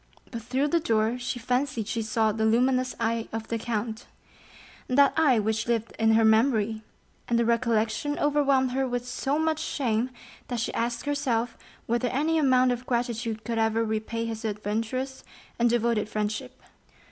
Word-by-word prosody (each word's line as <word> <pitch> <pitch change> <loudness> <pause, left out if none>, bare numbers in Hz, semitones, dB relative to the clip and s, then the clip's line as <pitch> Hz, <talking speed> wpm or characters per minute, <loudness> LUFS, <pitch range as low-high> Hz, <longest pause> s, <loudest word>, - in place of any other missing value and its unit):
But 230 -3 -5
through 260 +6 0
the 335 - +3
door 225 -3 +1
she 250 +1 -3
fancied 250 -2 -1
she 230 0 -2
saw 220 0 +1
the 220 +1 -2
luminous 255 +3 +2
eye 230 0 -1
of 225 0 -5
the 230 - -1
count—that 235 +4 -2
eye 295 -7 +4
which 220 +1 0
lived 230 -1 -1
in 225 0 +4
her 225 0 +4
memory, 220 -1 +3 0.5
and 235 - +2
the 235 - +2
recollection 230 +4 +1
overwhelmed 280 -3 +2
her 265 +1 0
with 245 0 -3
so 270 +3 -1
much 315 0 0
shame 250 -6 -1 0.4
that 245 -2 -3
she - - -2
asked 235 +3 -2
herself 255 -5 -1 0.3
whether 240 +2 0
any 310 +6 +1
amount 255 -3 +4
of 245 +1 -4
gratitude 235 -2 -2
could 230 -2 -2
ever 225 +1 +2
repay 220 +1 -2
his 225 0 -5
adventurous 225 +5 -3 0.4
and 240 0 +4
devoted 230 -2 +1
friendship. 215 +5 -3
235 Hz, 160 wpm, -27 LUFS, 225-255 Hz, 0.5 s, eye